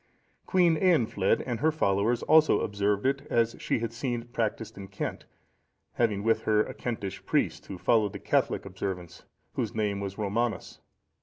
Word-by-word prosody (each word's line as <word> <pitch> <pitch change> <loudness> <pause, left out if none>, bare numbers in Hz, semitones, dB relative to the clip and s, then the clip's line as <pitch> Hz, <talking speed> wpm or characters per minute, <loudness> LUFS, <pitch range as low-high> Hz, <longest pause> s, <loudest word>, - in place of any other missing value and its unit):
Queen 175 -4 +4
Eanfled 115 - +2
and 120 -3 -3
her 160 +5 +3
followers 115 -4 +1
also 155 0 +5
observed 100 0 0
it 140 +1 +1
as 115 0 +2
she - - 0
had 115 -1 -3
seen 120 -1 -2
it 120 +1 -23
practised 115 -1 -2
in 100 -1 -8
Kent, 95 0 -5 0.7
having 105 -4 +1
with 115 +1 +2
her 105 0 +4
a - - -7
Kentish 100 -5 -5
priest - - 0
who 95 - -6
followed 105 +1 +2
the - - -4
Catholic - - 0
observance, 90 -2 -6 0.3
whose - - -3
name 105 -2 0
was 100 -1 -5
Romanus. 110 +2 -2
110 Hz, 165 wpm, -28 LUFS, 100-120 Hz, 0.7 s, also